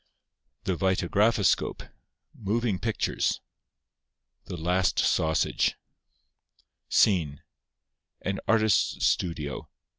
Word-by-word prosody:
The 95 - -1
Vitagraphoscope 95 +3 +1 0.5
(Moving 110 -1 -1
Pictures) 115 -3 -1 1.1
The 90 - -6
Last 90 +3 +1
Sausage 80 0 +1 1.1
SCENE—_An 90 +2 -2
Artist's 110 -5 +2
Studio. 75 -5 -1
95 Hz, 60 wpm, -27 LUFS, 85-105 Hz, 1.1 s, Artist's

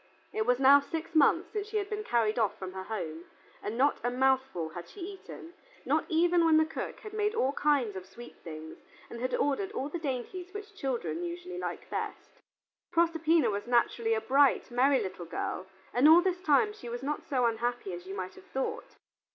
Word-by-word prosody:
It 220 +1 -1
was 250 0 +4
now 275 +1 +8
six 320 +3 -5
months 320 +2 +4
since 420 -1 -3
she 435 0 -2
had 405 -1 -1
been 420 0 -4
carried 230 - +1
off 215 -3 +1
from 190 -1 -6
her 190 0 -6
home, 170 -6 -5 0.4
and 215 +2 -4
not 280 +3 +3
a 245 - +2
mouthful 265 -9 +1
had 175 +2 -8
she 410 - -13
eaten, 360 -2 -9 0.3
not - - +1
even 340 +1 +3
when 320 -1 +5
the 315 - +5
cook 320 - -6
had 425 -1 -9
made 425 +1 0
all 275 -10 +1
kinds 280 -9 +1
of 185 0 -7
sweet 240 +5 -12
things 160 -1 -8 0.3
and 235 - -7
had 255 +1 0
ordered 380 +8 0
all 270 +3 -3
the 345 - -4
dainties 330 - -4
which 415 0 -7
children 270 -1 -3
usually 355 +1 -5
like - - -5
best. - - -5 0.5
Proserpina 330 -6 +3
was 205 +2 -4
naturally 235 -1 +2
a 220 - -1
bright, 270 +3 +3
merry 260 +3 +4
little 185 -3 -5
girl, 185 +2 -4 0.3
and 255 +5 +6
all 330 +2 +9
this 365 -1 0
time 380 +6 +3
she 420 - -9
was 240 +2 -5
not 295 +2 -2
so 255 -3 0
unhappy 235 -3 -1
as 175 +1 -8
you 195 - -5
may 185 - -1
have 185 - -16
thought. 450 - -4
270 Hz, 205 wpm, -30 LUFS, 225-345 Hz, 0.5 s, all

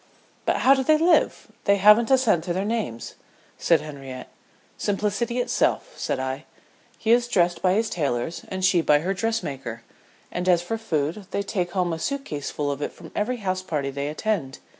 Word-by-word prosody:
"But - - +2
how 270 - +8
do 265 -1 +1
they 310 +3 +4
live? 335 +2 +2
they 200 - +5
haven't 210 +3 +6
a 265 - +6
cent 215 -11 +2
to 175 - -1
their 190 +3 -1
names," 210 - -3 0.5
said 165 -3 +3
Henriette. 135 -4 -8 0.5
"Simplicity 210 +4 -1
itself," - - 0
said - - -2
I. 130 +3 -3 0.5
"He 225 - 0
is 240 0 +4
dressed 175 -6 +1
by 185 -1 +3
his 220 +3 +1
tailors 145 - -2
and 190 -1 -1
she 185 -2 +4
by 150 -2 +4
her 185 +4 -1
dressmaker; 140 - -3 0.5
and 180 +1 -1
as 175 -1 +4
for 225 +6 -3
food, 170 -1 -2
they 200 - -2
take 180 -3 -2
home 180 -3 0
a 160 - -4
suit 280 - -2
case 145 -2 -4
full 145 -1 -2
of 140 0 -5
it - - -3
from - - -13
every 245 +4 -1
house 185 -4 -2
party 150 -6 -2
they 140 +1 -3
attend. 155 -4 -2
185 Hz, 195 wpm, -24 LUFS, 150-220 Hz, 0.5 s, how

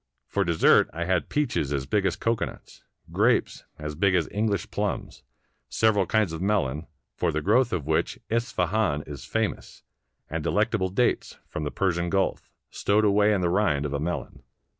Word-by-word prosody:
For 100 +9 0
dessert 85 -3 +4
I 85 +1 -3
had 90 -1 0
peaches 145 - 0
as 70 -2 -1
big 100 +8 +1
as - - -1
cocoanuts, 115 0 -3 0.3
grapes - - +1
as 75 0 -5
big 95 +4 +2
as 85 -3 +1
English 105 -1 -1
plums, - - -3 0.5
several 105 -4 +2
kinds 105 -6 +1
of 80 - -5
melon, 85 -7 0 0.3
for - - 0
the 80 - -1
growth 120 - +3
of 85 -8 -2
which 80 +1 0
Isfahan 110 - 0
is 70 -2 -8
famous, 110 +8 -3 0.4
and 80 0 -4
delectable 105 -1 +1
dates, 120 +6 0
from 75 - -5
the 75 - -2
Persian 85 -2 0
Gulf, 95 +2 -1 0.2
stowed 105 +1 +2
away 105 +1 +4
in 100 -3 +1
the 85 - +1
rind 75 -7 +1
of 70 - -3
a 70 - -1
melon. 85 -3 -4
90 Hz, 170 wpm, -26 LUFS, 75-105 Hz, 0.5 s, dessert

